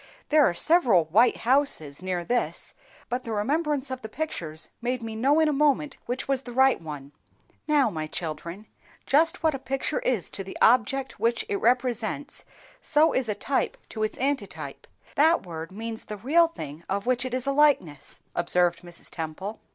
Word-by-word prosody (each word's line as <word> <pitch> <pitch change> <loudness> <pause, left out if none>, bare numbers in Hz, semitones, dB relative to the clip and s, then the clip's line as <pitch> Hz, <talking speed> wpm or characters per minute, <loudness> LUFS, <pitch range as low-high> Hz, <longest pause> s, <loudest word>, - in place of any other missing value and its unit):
"There 300 0 +6
are - - -2
several 230 - +4
white 215 +10 +4
houses 235 - +1
near 180 -2 -2
this, 245 +4 -1 0.3
but 245 +1 -3
the 230 - -6
remembrance 285 +5 0
of 260 0 -4
the 220 - -7
pictures 170 - -5
made 245 0 -2
me 225 -1 -5
know 275 +7 +3
in 315 - +4
a 300 - +2
moment 290 0 +2
which 245 +2 -3
was 270 -2 +1
the 245 - -9
right 265 -5 +4
one." 145 -3 -8 0.6
"Now, 285 -7 +3
my 155 -3 -4
children, 170 +5 -5 0.4
just 320 +5 +2
what 315 -1 +3
a 270 - -4
picture 270 +4 -2
is 235 -8 -1
to 195 - -4
the 190 - -8
object 255 +3 +3
which 230 0 +1
it 200 - -1
represents, 245 +3 0 0.3
so 305 +1 +3
is 255 -4 0
a 210 - 0
type 270 +6 -1
to 220 - -6
its 215 - -1
antitype; 275 +2 -3 0.3
that 320 - +3
word 165 -1 -7
means 225 +2 -6
the 210 - -6
real 310 - +4
thing 155 - -8
of 200 +1 -1
which 250 0 +1
it 255 -1 -3
is 255 0 -2
a 275 - +1
likeness," 275 - +2
observed 175 0 +2
Mrs. 175 -1 -8
Temple. 170 +6 -5
240 Hz, 180 wpm, -26 LUFS, 185-275 Hz, 0.6 s, There